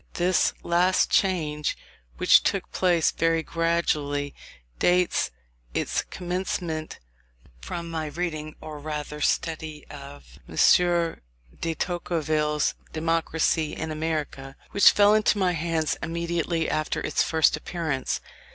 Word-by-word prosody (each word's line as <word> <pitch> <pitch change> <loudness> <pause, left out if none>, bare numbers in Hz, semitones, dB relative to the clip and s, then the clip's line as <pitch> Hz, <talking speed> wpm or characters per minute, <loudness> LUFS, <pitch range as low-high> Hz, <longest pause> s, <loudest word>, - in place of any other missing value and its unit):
This 180 +1 +2
last 180 +2 +2
change, 155 -6 +1 0.4
which - - +6
took - - -1
place 175 -3 +2
very 165 -1 +1
gradually, 150 -4 0 0.5
dates 180 - +2 0.5
its - - 0
commencement 175 -3 -4 0.6
from 170 - -5
my 160 -2 -3
reading, 155 -1 -4
or 155 -1 -8
rather 150 0 -5
study, 155 -1 -1
of 140 - -12
M. - - -9 1.0
de 165 -1 -2
Tocqueville's 155 -4 0 0.2
Democracy 165 -1 0
in 160 0 -4
America, 155 -4 -3 0.2
which 200 - +7
fell 205 0 +5
into 215 -1 +3
my 185 -2 +2
hands 165 -2 -1
immediately 170 0 -1
after 155 0 -1
its - - 0
first 160 -1 +3
appearance. 155 -7 -3
160 Hz, 110 wpm, -25 LUFS, 150-170 Hz, 1.0 s, which